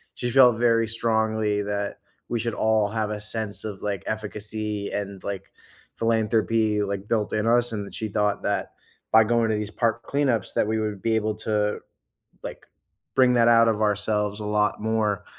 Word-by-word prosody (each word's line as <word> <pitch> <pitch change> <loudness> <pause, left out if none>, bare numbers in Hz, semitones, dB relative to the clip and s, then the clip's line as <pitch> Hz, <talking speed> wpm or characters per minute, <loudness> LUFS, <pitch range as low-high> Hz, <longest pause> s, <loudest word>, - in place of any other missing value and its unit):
she 120 - -2
felt 125 -2 +6
very 115 -1 +2
strongly 110 -2 0
that 100 0 -3 0.3
we 120 - -2
should 115 0 -2
all 110 -1 +1
have 110 0 -2
a 105 -1 -4
sense 105 -2 0
of, 105 -3 -6
like, 100 -3 -3
efficacy 105 -1 -3
and 100 -2 -5
like, 100 -2 -6 0.4
philanthropy, 110 -1 +1
like, 100 0 -4
built 105 -2 -1
in 110 +1 0
us, 120 +1 +3
and 105 -2 -4
that - - -12
she 110 - -2
thought 105 0 0
that 100 -2 -2 0.4
by 110 0 +7
going 115 0 +1
to 110 - +1
these 105 0 -3
park 115 +1 -1
cleanups, 135 -8 +1
that - - +1
we 110 0 0
would 105 -3 -3
be 115 +2 +1
able 110 -1 0
to, 105 -1 -1 0.6
like, - - -8 0.5
bring 130 -1 +5
that 120 -1 +4
out 115 0 +6
of 110 -1 0
ourselves 105 0 +1
a - - -5
lot 105 0 0
more, 105 -3 -1
110 Hz, 185 wpm, -24 LUFS, 105-115 Hz, 0.6 s, by